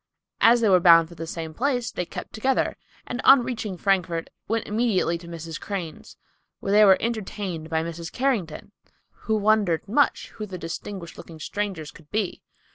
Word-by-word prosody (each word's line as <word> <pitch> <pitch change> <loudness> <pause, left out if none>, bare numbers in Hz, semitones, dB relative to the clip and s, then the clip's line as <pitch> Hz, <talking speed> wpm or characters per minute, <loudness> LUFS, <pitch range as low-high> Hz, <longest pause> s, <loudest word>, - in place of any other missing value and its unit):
As 235 +1 +6
they 220 - +3
were 185 -1 +6
bound 165 -2 +7
for - - -11
the 165 0 -7
same 160 -1 -5
place, 245 - -1
they 180 - -4
kept - - -8
together, 260 +4 0 0.3
and 250 +1 -4
on 270 -2 +7
reaching 225 -6 -4
Frankfort, 175 -4 0 0.2
went 225 +1 -1
immediately 210 -5 +1
to 170 - -12
Mrs. 165 -1 -7
Crane's, 180 -6 -6 0.4
where 195 - -3
they 210 +1 +7
were 195 -2 +7
entertained 200 -7 -4
by 160 0 0
Mrs. 170 0 -6
Carrington, 210 - -2 0.4
who 220 - -2
wondered 205 -5 +2
much 270 +8 +1
who 215 -1 -7
the 190 -2 -6
distinguished 170 +1 -7
looking 160 -2 -11
strangers 185 -4 -4
could 150 -2 -18
be. 210 -1 -2
195 Hz, 175 wpm, -25 LUFS, 165-220 Hz, 0.4 s, bound